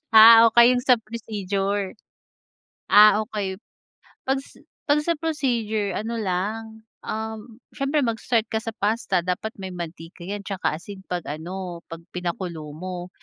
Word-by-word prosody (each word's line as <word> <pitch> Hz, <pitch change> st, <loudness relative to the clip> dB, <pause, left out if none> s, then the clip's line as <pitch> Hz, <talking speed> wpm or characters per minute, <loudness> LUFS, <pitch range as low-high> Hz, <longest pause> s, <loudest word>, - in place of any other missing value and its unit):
Ah 225 Hz, +1 st, +10 dB
okey 235 Hz, +2 st, +6 dB
'yung 245 Hz, -, 0 dB
sa 250 Hz, -3 st, +6 dB
procedure. 205 Hz, -3 st, -3 dB, 1.0 s
Ah 210 Hz, +1 st, +7 dB
okey. 200 Hz, -4 st, -4 dB, 0.7 s
Pag 270 Hz, +1 st, +1 dB, 0.5 s
pag 290 Hz, +1 st, +5 dB
sa 335 Hz, +3 st, +1 dB
procedure 235 Hz, -, -1 dB
ano 225 Hz, +2 st, -3 dB
lang, 200 Hz, +2 st, -1 dB, 0.4 s
um, 220 Hz, +1 st, -5 dB, 0.2 s
siyempre 280 Hz, +1 st, 0 dB
mag-start 230 Hz, -1 st, 0 dB
ka 220 Hz, -, 0 dB
sa 225 Hz, -1 st, -5 dB
pasta, 210 Hz, -3 st, 0 dB
dapat 185 Hz, +5 st, -2 dB
may 190 Hz, -1 st, -6 dB
mantika 170 Hz, 0 st, -8 dB
'yan 200 Hz, +2 st, -5 dB
'tsaka 190 Hz, -6 st, -1 dB
asin, 190 Hz, +3 st, -10 dB
pag 180 Hz, -2 st, -2 dB
ano 175 Hz, +3 st, -6 dB
pag 165 Hz, 0 st, -8 dB
pinakulo 175 Hz, -3 st, -4 dB
mo. 180 Hz, +2 st, -6 dB
210 Hz, 135 wpm, -24 LUFS, 185-230 Hz, 1.0 s, Ah